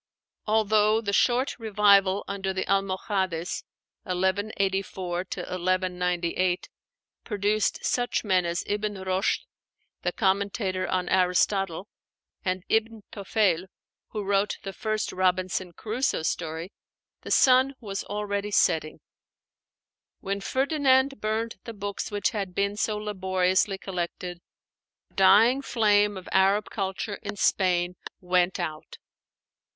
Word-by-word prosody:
Although 215 Hz, 0 st, +3 dB
the 200 Hz, -2 st, -3 dB
short 250 Hz, +4 st, +2 dB
revival 200 Hz, -3 st, +4 dB
under 195 Hz, -1 st, -3 dB
the 190 Hz, -, -2 dB
Almohades 190 Hz, -3 st, -1 dB, 0.4 s
(1184 190 Hz, -1 st, -1 dB
1198) 180 Hz, -1 st, -1 dB, 0.5 s
produced 210 Hz, 0 st, 0 dB
such 245 Hz, -1 st, 0 dB
men 185 Hz, -4 st, +2 dB
as 170 Hz, +1 st, -2 dB
Ibn 210 Hz, 0 st, -2 dB
Roshd, 190 Hz, 0 st, 0 dB, 0.6 s
the -, -, 0 dB
commentator 195 Hz, -2 st, 0 dB
on 185 Hz, -1 st, -1 dB
Aristotle, 185 Hz, 0 st, +1 dB, 0.6 s
and 185 Hz, -1 st, -1 dB
Ibn 225 Hz, -1 st, 0 dB
Toféil, 195 Hz, -3 st, +1 dB, 0.4 s
who 210 Hz, -2 st, -5 dB
wrote 200 Hz, +1 st, +1 dB
the 195 Hz, -, -5 dB
first 215 Hz, 0 st, -2 dB
'Robinson 185 Hz, 0 st, 0 dB
Crusoe' 220 Hz, +2 st, -2 dB
story, 165 Hz, +2 st, -3 dB, 0.5 s
the -, -, -9 dB
sun 260 Hz, +1 st, +5 dB
was 200 Hz, -4 st, -4 dB
already 205 Hz, 0 st, -3 dB
setting. 160 Hz, -5 st, +1 dB, 1.2 s
When 200 Hz, 0 st, -3 dB
Ferdinand 270 Hz, 0 st, +2 dB
burned 220 Hz, +2 st, -2 dB
the 230 Hz, -, -6 dB
books 200 Hz, 0 st, -4 dB
which 205 Hz, +4 st, 0 dB
had 195 Hz, -5 st, -4 dB
been 200 Hz, +1 st, 0 dB
so 215 Hz, 0 st, -1 dB
laboriously 190 Hz, -1 st, 0 dB
collected, 180 Hz, -1 st, -5 dB, 0.7 s
the -, -, -32 dB
dying 215 Hz, +8 st, +6 dB
flame 210 Hz, -5 st, +2 dB
of 185 Hz, -, -9 dB
Arab 195 Hz, +2 st, +3 dB
culture 195 Hz, +1 st, -3 dB
in 205 Hz, -1 st, -5 dB
Spain 180 Hz, -3 st, +1 dB, 0.2 s
went 180 Hz, 0 st, +1 dB
out. 155 Hz, -3 st, -5 dB
195 Hz, 110 wpm, -26 LUFS, 185-210 Hz, 1.2 s, dying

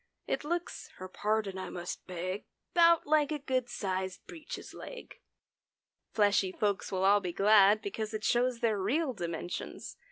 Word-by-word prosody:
It -, -, -2 dB
looks 345 Hz, +3 st, -3 dB
(her 185 Hz, -, -8 dB
pardon 205 Hz, 0 st, -1 dB
I 185 Hz, -, -5 dB
must 175 Hz, 0 st, -6 dB
beg), 185 Hz, +2 st, -4 dB, 0.3 s
'Bout 335 Hz, -2 st, +5 dB
like 300 Hz, 0 st, +3 dB
a 305 Hz, -, 0 dB
good 260 Hz, -3 st, -1 dB
sized 190 Hz, -4 st, -3 dB
breeches 320 Hz, -3 st, -8 dB
leg. -, -, -10 dB, 0.9 s
Fleshy 205 Hz, -3 st, +3 dB
folks 200 Hz, 0 st, -1 dB
will 190 Hz, 0 st, 0 dB
all 200 Hz, +1 st, +6 dB
be 180 Hz, -3 st, -4 dB
glad 205 Hz, +2 st, +5 dB
Because 215 Hz, +2 st, -4 dB
it 215 Hz, -1 st, -4 dB
shows 245 Hz, 0 st, +1 dB
their 220 Hz, -3 st, +2 dB
real 265 Hz, +8 st, +1 dB
dimensions. 170 Hz, -3 st, -5 dB
210 Hz, 155 wpm, -31 LUFS, 190-260 Hz, 0.9 s, all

